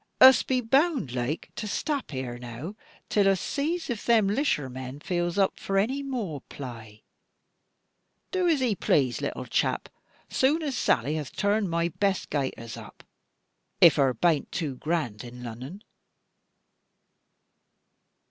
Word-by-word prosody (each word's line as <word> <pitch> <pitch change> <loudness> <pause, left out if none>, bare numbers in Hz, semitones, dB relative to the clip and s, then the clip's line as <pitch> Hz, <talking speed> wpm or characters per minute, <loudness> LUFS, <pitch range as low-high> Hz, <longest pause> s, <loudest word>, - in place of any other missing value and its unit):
Us 260 0 +9
be 255 -1 0
bound 270 - +2
laike 125 +5 -3
to 215 - -4
stap 285 +6 -2
here 130 -3 -5
now 125 - -7 0.3
till 205 -2 +3
us 195 -2 +2
zees 320 +4 -1
if 235 -4 -3
them 230 -3 +4
'lisher 200 - +1
men 130 +2 -7
feels 175 +2 -1
up 195 -1 +2
for 195 - -1
any 255 +8 +1
moor 225 - -4
plai. 115 -5 -9 1.3
Do 370 -2 +1
as 305 -6 +3
'e 240 -4 +2
plase, 135 -9 +1
little - - -3
chap, - - 0 0.4
zoon 300 +5 +3
as 280 -4 -2
Sally 145 - +1
hath 150 -4 -6
toorned 205 0 +1
my 170 0 +1
best 195 +3 -1
gaiters 130 -6 -3
up, - - -12 0.8
if 165 -4 +7
her 135 -3 +3
bain't 160 +3 +1
too 150 -6 -2
grand 150 -11 -2
in 125 0 -9
Lunnon." 130 - -8
175 Hz, 140 wpm, -27 LUFS, -, 1.3 s, Us